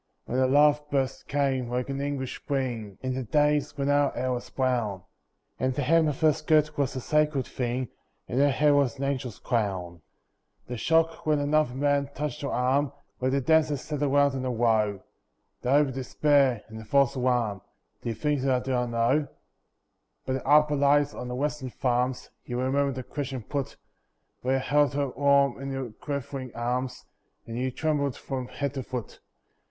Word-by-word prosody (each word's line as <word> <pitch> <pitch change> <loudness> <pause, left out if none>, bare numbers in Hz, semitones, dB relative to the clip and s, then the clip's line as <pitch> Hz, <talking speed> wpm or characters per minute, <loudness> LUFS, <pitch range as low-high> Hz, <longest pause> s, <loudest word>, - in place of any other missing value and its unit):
When 125 - -1
the 130 - +4
love 145 +2 +4
burst 135 -1 -1
came, 135 -3 0
like 125 +1 -2
an 140 0 -3
English 140 -2 -3
Spring, 120 -8 -3
In 130 0 -1
the 130 - -2
days 150 +5 +1
when 140 -1 -1
our 145 0 +3
hair 130 +1 -1
was 125 -1 -4
brown, 120 -8 -1 0.6
And 130 0 0
the 145 - -1
hem 165 +4 +4
of 150 0 -3
her 155 -1 +5
skirt 155 -1 +2
was 140 -1 -1
a - - -2
sacred 150 0 +1
thing 125 0 -2 0.4
And 125 - -1
her 145 +1 +5
hair 145 +2 +3
was 140 -4 +2
an 135 - -4
angel's 130 -5 -2
crown. 95 -7 -2 0.6
The 125 - -5
shock 165 +6 +1
when 155 -1 +4
another 145 -2 +1
man 140 0 +1
touched 150 0 -3
her 140 - -2
arm, 135 +3 +1 0.3
Where 130 - +1
the 135 +1 +1
dancers 155 0 +3
sat 150 -2 -4
round 145 0 +3
in 130 -1 -3
a 130 - -1
row; 110 -4 +1 0.6
The 125 - -2
hope 145 +2 +5
and - - -6
despair, 135 -2 +2
and 110 0 -9
the 110 - -10
false 140 +1 +3
alarm— 120 -6 0 0.4
Do - - -4
you 115 - -2
think 145 +4 0
that 135 - 0
I - - +1
do 130 - -4
not 125 -1 0
know? 120 +6 +2 1.0
By 130 - -1
the 130 - -3
arbour 150 +1 +4
lights 145 +1 +3
on 125 - -6
the 125 - -4
western 145 -1 -2
farms, 125 0 -1
You 120 0 -4
remember 140 +2 +1
the 130 0 -5
question 135 -3 -5
put, 140 +1 -4 0.6
While 130 +1 +1
you 135 - 0
held 145 +1 +2
her 140 -1 0
warm 140 +1 +2
in 135 - -4
your 135 -3 -4
quivering 140 0 -5
arms 125 +2 -2 0.4
And 115 - -7
you 130 +1 0
trembled 140 0 -1
from 130 -2 -5
head 140 +1 -3
to 135 - -3
foot. 125 -3 -6
135 Hz, 190 wpm, -27 LUFS, 125-145 Hz, 1.0 s, her